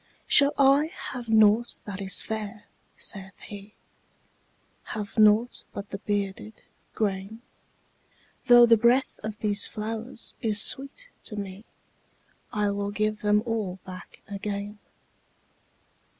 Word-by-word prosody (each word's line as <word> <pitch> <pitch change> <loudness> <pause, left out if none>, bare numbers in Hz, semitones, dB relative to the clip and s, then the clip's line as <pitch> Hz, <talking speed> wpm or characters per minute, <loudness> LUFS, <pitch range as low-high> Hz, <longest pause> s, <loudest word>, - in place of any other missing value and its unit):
``Shall 285 0 +6
I 280 +2 +5 0.2
have 245 -3 -7
nought 220 +2 +4
that 200 -1 -6
is 195 0 0
fair?'' 215 -1 -5 0.3
saith 195 -1 -5
he; 205 0 -11 1.2
``Have 210 0 -5
nought 215 +2 +4
but 200 0 -7
the 200 - -5
bearded 205 +1 -4 0.3
grain? 205 +2 -3 1.0
Though 240 -1 +9
the 230 -1 +6
breath 240 +4 +2
of 215 -1 -5
these 205 -1 +1
flowers 225 +2 -5
is 215 -3 +2
sweet 275 - 0 0.2
to 215 - -7
me, 200 +1 -7 0.9
I 210 -1 0
will 200 0 -2
give 215 +1 -1
them 210 0 +3
all 215 -6 -2
back 185 -2 -11
again.'' 205 +1 -5
210 Hz, 120 wpm, -26 LUFS, 200-230 Hz, 1.2 s, Though